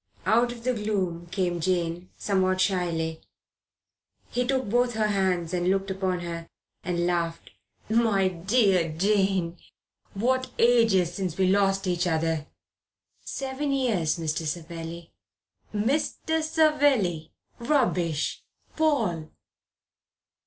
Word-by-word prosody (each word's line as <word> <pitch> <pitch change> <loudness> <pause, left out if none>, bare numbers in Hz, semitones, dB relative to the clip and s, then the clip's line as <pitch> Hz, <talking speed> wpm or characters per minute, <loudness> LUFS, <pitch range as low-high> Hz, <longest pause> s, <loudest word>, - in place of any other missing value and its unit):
Out 235 +2 +3
of 235 -1 -10
the 255 +1 +1
gloom 190 -6 -2
came 175 -1 -1
Jane, 175 0 -1
somewhat 185 -2 +1
shyly. 170 -4 0 1.1
He 245 0 0
took 260 -3 0
both 240 +2 +1
her 215 -1 +1
hands 185 -4 0
and 180 0 +1
looked 195 0 0
upon 185 -2 -1
her, 170 -1 -5 0.4
and 175 -1 -1
laughed. 170 -1 -2 0.4
"My 220 -4 +3
dear 185 -1 +2
Jane! 190 -3 +1 0.6
What 255 +5 +1
ages 225 -7 +4
since 180 -3 -3
we 190 -1 +3
lost 195 0 +2
each 180 -1 0
other!" 160 -2 0 0.8
"Seven 275 +1 -3
years, 220 - +1
Mr. 160 -1 -2
Savelli." 165 +1 -6 0.6
"'Mr. 290 +8 0
Savelli!' 290 - +2 0.3
Rubbish! 205 - 0 0.3
Paul." 225 - +1
190 Hz, 110 wpm, -26 LUFS, 170-230 Hz, 1.1 s, ages